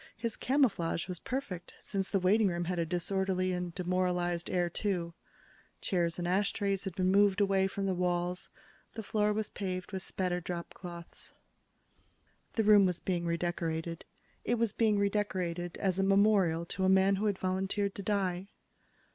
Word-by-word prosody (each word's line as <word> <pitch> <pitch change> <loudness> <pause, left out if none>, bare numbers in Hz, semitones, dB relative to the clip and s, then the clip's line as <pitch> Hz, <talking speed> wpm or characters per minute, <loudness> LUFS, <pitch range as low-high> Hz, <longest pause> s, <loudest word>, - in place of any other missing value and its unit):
His 230 -1 -3
camouflage 210 - +1
was 180 -2 -5
perfect, 205 -10 -5
since 195 -2 -3
the 200 - +2
waiting 200 +4 +4
room 175 -1 -1
had 180 0 -2
a 165 - 0
disorderly 185 +1 0
and 180 -1 -2
demoralized 180 -1 0
air, 180 -1 +1
too. 175 -2 -2 0.7
Chairs 170 -3 0
and 175 -1 -2
ashtrays 200 +1 0
had 190 -3 -4
been 185 0 +2
moved 200 0 +4
away 195 -1 +3
from 195 0 -3
the 190 - +1
walls. 180 0 -1 0.5
The 220 - -5
floor 210 0 +1
was 215 0 -2
paved 185 -2 -4
with 190 -1 -3
spattered 180 -1 -2
dropcloths. 170 0 -7 1.2
The 225 - +1
room 205 -2 +7
was 180 -1 -1
being 175 -2 -1
redecorated. 170 -1 -2 0.4
It 240 - +1
was 230 -3 0
being 215 -2 +2
redecorated 185 -4 -1
as 190 -2 0
a - - +3
memorial 195 -4 +3
to 190 +2 -3
a 190 - +4
man 190 +1 +4
who 210 +2 0
had 200 -2 0
volunteered 190 +2 -1
to - - -6
die. 195 -2 -1
185 Hz, 165 wpm, -31 LUFS, 175-200 Hz, 1.2 s, room